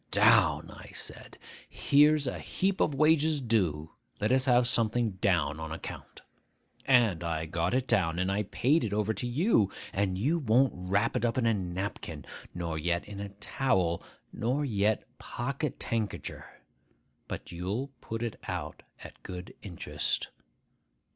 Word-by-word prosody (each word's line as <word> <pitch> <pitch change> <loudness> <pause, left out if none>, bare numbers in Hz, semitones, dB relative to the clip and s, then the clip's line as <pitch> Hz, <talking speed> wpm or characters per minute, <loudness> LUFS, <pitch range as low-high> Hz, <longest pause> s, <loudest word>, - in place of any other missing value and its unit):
Down! - - +4
I - - -12
said, - - -5 0.3
"Here's 150 +1 +4
a 125 - -3
heap 195 +1 -1
of 145 - +2
wages 155 +1 +3
due; 90 - 0 0.3
let 105 +3 +1
us 130 0 +4
have 125 -2 +4
something 115 -1 +2
down, 85 -6 +1
on 80 0 -5
account." 80 - -8 0.6
And 115 -10 +4
I 80 -1 -2
got 85 +5 -1
it 130 0 0
down, 85 -8 +2
and 95 +1 0
I 100 +2 +1
paid 135 - +1
it 105 - -2
over 105 +1 +1
to 110 +4 -3
you; 120 - +2 0.2
and 95 -1 0
you 150 - +1
won't 130 0 +3
wrap 95 +5 0
it - - 0
up 120 0 +1
in 125 - +2
a 115 - +4
napkin, 90 -5 -4 0.3
nor 85 -2 -3
yet 85 +2 0
in 100 -1 -8
a 100 0 -5
towel, 95 -4 0 0.3
nor 130 +6 0
yet 105 -3 +1 0.2
pocketankercher, 120 -4 -3 0.8
but - - -6
you'll 95 +10 -3
put 115 +1 -4
it 115 - -3
out - - -4 0.2
at - - -12
good 90 -1 -8
interest. 90 -5 -3
105 Hz, 150 wpm, -30 LUFS, 90-130 Hz, 0.8 s, Down